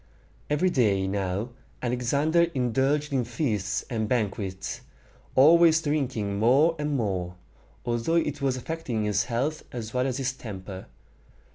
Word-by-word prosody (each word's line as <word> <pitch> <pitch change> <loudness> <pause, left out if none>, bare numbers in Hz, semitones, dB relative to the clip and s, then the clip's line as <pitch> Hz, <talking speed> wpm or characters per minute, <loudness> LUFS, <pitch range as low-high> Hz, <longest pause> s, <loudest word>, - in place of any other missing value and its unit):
Every 150 +5 +2
day 100 - +2
now 95 +3 -2 0.3
Alexander 140 +7 +2
indulged 135 +4 +1
in 130 -2 +2
feasts 110 -4 -2
and 110 -4 -2
banquets, 100 -5 -2 0.5
always 160 +4 +7
drinking 130 -10 -1
more 140 +9 +4
and 150 -1 0
more, 95 -6 -2 0.5
although 120 +7 0
it 150 -4 0
was 135 -2 +1
affecting 130 -5 -3
his 105 0 +1
health 135 +8 -1
as 115 -2 -6
well 125 +1 +1
as 130 -1 -2
his 130 -1 -1
temper. 95 -6 -8
125 Hz, 130 wpm, -26 LUFS, 105-145 Hz, 0.5 s, always